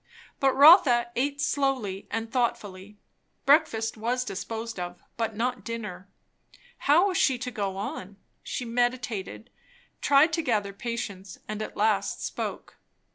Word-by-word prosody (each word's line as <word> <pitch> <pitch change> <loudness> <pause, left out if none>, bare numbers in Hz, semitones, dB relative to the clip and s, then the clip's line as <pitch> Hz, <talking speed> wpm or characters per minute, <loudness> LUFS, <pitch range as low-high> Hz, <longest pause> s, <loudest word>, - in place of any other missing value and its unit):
But 270 -1 +3
Rotha 275 -6 +7
eat 280 +3 -1
slowly 270 -9 -1
and 225 0 -4
thoughtfully. 210 -5 -2 0.5
Breakfast 225 -7 +3
was 245 +3 -1
disposed 225 +1 -5
of, 175 0 -6
but 225 -2 -2
not 245 +3 -2
dinner. 210 -5 -6 0.8
How 340 +7 +6
was 365 - -1
she 265 -3 +3
to 250 +1 -5
go 200 -4 -3
on? 195 0 -6 0.2
She 250 - -5
meditated, 240 -2 -2 0.5
tried 290 +3 +4
to 330 - +1
gather 210 -8 -1
patience, 200 -4 -5
and 215 0 -4
at - - -6
last 210 -1 0
spoke. - - -5
230 Hz, 130 wpm, -27 LUFS, 205-255 Hz, 0.8 s, Rotha